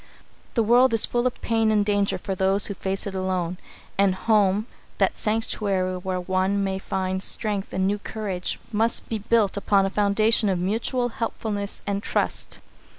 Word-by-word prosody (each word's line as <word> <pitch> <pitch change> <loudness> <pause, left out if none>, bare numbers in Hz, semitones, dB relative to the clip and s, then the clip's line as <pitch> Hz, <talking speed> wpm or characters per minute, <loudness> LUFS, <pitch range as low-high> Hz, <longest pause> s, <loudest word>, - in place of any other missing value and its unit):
The 230 - +3
world 240 +2 +5
is 225 - +4
full 240 +1 0
of 250 - -4
pain 225 -1 +2
and 210 -1 +3
danger 205 -1 +1
for 195 - -4
those 190 +2 +2
who 200 - -1
face 195 0 -3
it 200 - -4
alone, 185 -2 -2 0.4
and 195 -2 +4
home, 210 -1 +2 0.3
that - - +2
sanctuary 200 -4 0
where 185 0 -3
one 190 +2 0
may 190 -1 -1
find 190 -1 -2
strength 205 -1 -1
and 190 0 0
new 205 +2 0
courage, 200 -4 -3
must 225 +2 0
be 225 - -1
built 210 -2 +2
upon 200 -1 +3
a 195 - -2
foundation 210 +2 +3
of 185 - +1
mutual 230 +7 -1
helpfulness 215 -3 -3
and 200 0 -1
trust. - - -1
200 Hz, 170 wpm, -24 LUFS, 190-220 Hz, 0.4 s, world